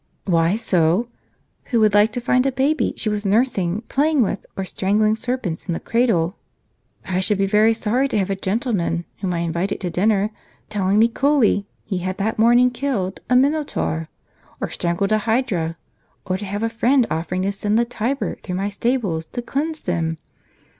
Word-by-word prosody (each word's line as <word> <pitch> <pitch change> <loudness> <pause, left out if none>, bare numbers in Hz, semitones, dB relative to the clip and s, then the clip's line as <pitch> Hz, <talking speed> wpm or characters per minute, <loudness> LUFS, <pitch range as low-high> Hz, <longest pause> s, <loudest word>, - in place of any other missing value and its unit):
o 190 - -2
"Why 165 +2 +3
so? 190 0 +1 0.6
who 235 - +1
would 215 -1 +5
hke 205 +2 +4
to 245 - -1
find 250 +2 +2
a - - +1
baby 275 +5 +1
she - - -2
was 210 -1 -1
nursing, 205 -3 +1
playing 295 -1 +2
with, 200 - -3
or 195 - -2
strangling, 210 +3 +1
serpents 225 -7 -3
in 175 - -1
the - - -3
cradle? 210 -7 +1 0.7
I 185 -1 -1
should 195 +2 +1
be 195 - +2
very 215 +3 +4
sorry 240 +5 +1
to 245 - -1
have 195 -1 0
a - - 0
gentleman, 190 -4 -1
whom 190 -2 -2
I 170 - -1
invited 170 +3 -2
to 180 -2 -2
dinner, 205 +3 +1 0.4
telling 200 -1 +1
me 225 +2 +6
coolly 235 -5 +2 0.2
he 190 -4 -2
had 185 +1 -3
that 215 +2 -2
morning 240 +2 +5
killed 240 -8 -2
a 250 - +4
minotaur, 250 - +1 0.5
or - - -3
strangled 175 +4 -1
a 215 - +4
hydra; 215 -8 -1 0.5
or 185 - -1
to 200 +2 -5
have 205 +2 -3
a - - +2
friend 240 +3 +2
offering 175 +3 -2
to 195 - 0
send 205 +2 0
the 235 - +3
Tiber 245 +3 -2
through 180 - -5
my 195 +2 -1
stables, 205 -7 -1
to 245 - -5
cleanse 310 +6 -2
them. 165 -2 -1
210 Hz, 190 wpm, -21 LUFS, 185-240 Hz, 0.7 s, me